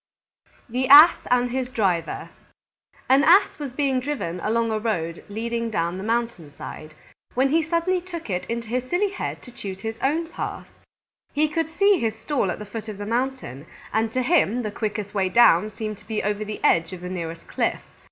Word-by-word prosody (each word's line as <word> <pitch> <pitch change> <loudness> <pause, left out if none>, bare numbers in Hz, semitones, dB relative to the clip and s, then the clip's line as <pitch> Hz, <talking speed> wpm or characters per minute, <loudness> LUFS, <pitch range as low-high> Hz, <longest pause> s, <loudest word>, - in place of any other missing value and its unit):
_ - - -33 0.2
THE 255 +2 -1
ASS 295 +5 +8
AND 245 0 +2
HIS 255 0 -2
DRIVER 185 -9 -1 0.8
An 270 +2 +5
Ass 365 +3 +5
was 285 -3 -5
being 270 -1 0
driven 250 - -3
along 230 +4 0
a 215 - 0
road 170 -7 -2
leading 230 +2 -3
down 170 -3 -1
the - - -5
mountain 230 -8 -2
side, 155 +2 -9 0.4
when 265 +2 +3
he 325 +4 +3
suddenly 335 +3 0
took 345 -2 -8
it 180 -3 -3
into 230 0 -4
his 255 +1 -2
silly 395 +3 +1
head - - -5
to 245 - -12
choose 195 -4 -7
his 225 +1 -5
own 315 +5 +1
path. 330 - -6 0.7
He 305 +2 +2
could 320 +1 -2
see 395 +3 +3
his 220 -1 -1
stall 220 -2 -1
at - - -2
the 210 - -8
foot 220 +1 -7
of 210 - -6
the 205 - -5
mountain, 235 - -3 0.3
and 220 +1 +1
to 255 +2 0
him 250 - +2
the 215 - -3
quickest 210 -1 -4
way 190 -2 +1
down 210 -3 +5
seemed 215 -1 -6
to - - -21
be 220 -1 -2
over 210 +1 -1
the 210 0 -7
edge 165 +1 +3
of 180 - -8
the 180 - -6
nearest 165 -2 -6
cliff. - - -1
230 Hz, 200 wpm, -24 LUFS, 205-270 Hz, 0.8 s, ASS